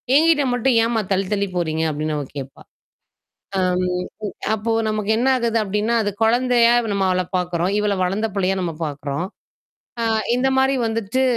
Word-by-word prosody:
என்கிட்ட 315 -1 +4
மட்டும் 245 +1 +2
ஏம்மா 230 -1 +1
தள்ளி, 190 0 +1
தள்ளி 200 -1 0
போறீங்க?" 160 -2 -1
அப்டின்னு 155 +1 -2
அவ 145 - -2
கேட்பா. 135 0 -8 1.0
ஆ, - - +1 0.2
ம். 180 +3 -4 0.2
அப்போ 220 +2 -3 0.2
நமக்கு 215 -1 -1
என்ன 255 - +2
ஆகுது 235 -2 0
அப்படின்னா, 210 +3 0
அது 205 - -1
குழந்தையா 240 0 +4 0.2
நம்ம 195 -1 0
அவள 185 0 +1 0.2
பாக்குறோம். 180 +1 -1
இவள 210 -1 +1
வளர்ந்த 200 +5 -1
பிள்ளையா 195 -1 +1
நம்ம 175 -2 -2
பாக்குறோம். 145 +2 -4 0.8
ஆ, - - +1 0.3
இந்த 265 +1 +2
மாரி 265 +1 +3
வந்துட்டு. 225 +3 -1
205 Hz, 160 wpm, -21 LUFS, 180-235 Hz, 1.0 s, என்கிட்ட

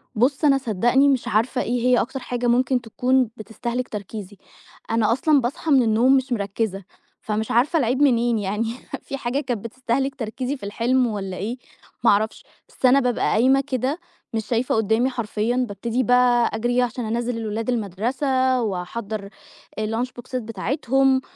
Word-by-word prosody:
بُصّ 265 +7 +2
أنا 275 -2 +5
صدّقني 240 +2 +2
مش 265 -3 0
عارفة 230 +5 +1
إيه 240 +1 -1
هي 250 -1 +5
أكتر 270 +3 -4
حاجة 245 -1 -3
ممكن 250 +1 +2
تكون 250 +2 +1
بتستهلِك 235 +3 -4
تركيزي، 205 -1 -7 0.5
أنا 225 -1 +2
أصلًا 280 +4 +3
باصحى 270 +6 -2
من 265 -3 +6
النوم 235 +4 +4
مش 260 0 -2
مركّزة، 200 -2 -2 0.4
فمش 215 0 -2
عارفة 270 +8 +3
العيب 255 +1 +1
منين 240 -4 +3
يعني، 210 +3 -2 0.3
في 275 - -6
حاجة 260 +1 -1
كانت 245 -7 -3
بتستهلِك 260 +3 -2
تركيزي 255 +3 -4
في - - -17
الحلم 240 +5 +1
والّا 195 -4 -4
إيه، 225 +6 -3 0.5
ما 235 - +5
أعرفش، 215 +2 0 0.3
بس - - -3
أنا 255 +2 +6
بابقى 250 -3 0
قايمة 260 +5 +4
كده 275 +3 -2 0.3
مش 220 -1 -2
شايفة 235 +3 0
قدّامي 220 +3 +2
حرفيًا، 230 -1 -2
بابتدي 230 +5 -2
بقى 245 -1 +4
أجري 240 +2 -1
ي - - +5
عشان 245 -1 -2
انزّل 235 +2 -2
الولاد 225 +1 -3
المدرسة، 255 +5 0
واحضّر 205 +1 -4 0.5
الLunch 225 +4 -2
بوكسات 250 +1 -5
بتاعتهم، 260 +5 +1
240 Hz, 160 wpm, -23 LUFS, 220-260 Hz, 0.5 s, من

